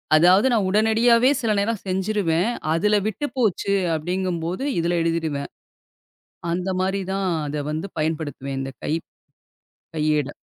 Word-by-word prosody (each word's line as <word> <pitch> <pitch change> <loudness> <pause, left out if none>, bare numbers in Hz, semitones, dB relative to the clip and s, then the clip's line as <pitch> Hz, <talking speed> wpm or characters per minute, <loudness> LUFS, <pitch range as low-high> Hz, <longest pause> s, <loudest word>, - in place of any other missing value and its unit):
அதாவது 180 +8 +6
நான் 210 -5 +2
உடனடியாவே 225 +4 +4
சில 230 -3 +1
நேரம் 215 +1 -1
செஞ்சுருவேன். 190 -1 0 0.2
அதுல 210 +6 +2
விட்டுப் 275 +8 -4
போச்சு 205 -4 +1 0.2
அப்படிங்கம்போது 175 - -2
இதுல 170 +1 +1
எழுதிடுவேன். 160 -4 -1 1.0
அந்த 180 +2 -1
மாரி 195 +1 0
தான் 195 0 -1 0.2
அத 145 0 -3
வந்து 160 +5 -3
பயன் 155 +1 0
படுத்துவேன், 140 -3 -5
இந்த 135 0 -4
கை - - 0 1.0
கையேட. 150 -2 +1
180 Hz, 125 wpm, -23 LUFS, 160-210 Hz, 1.0 s, அதாவது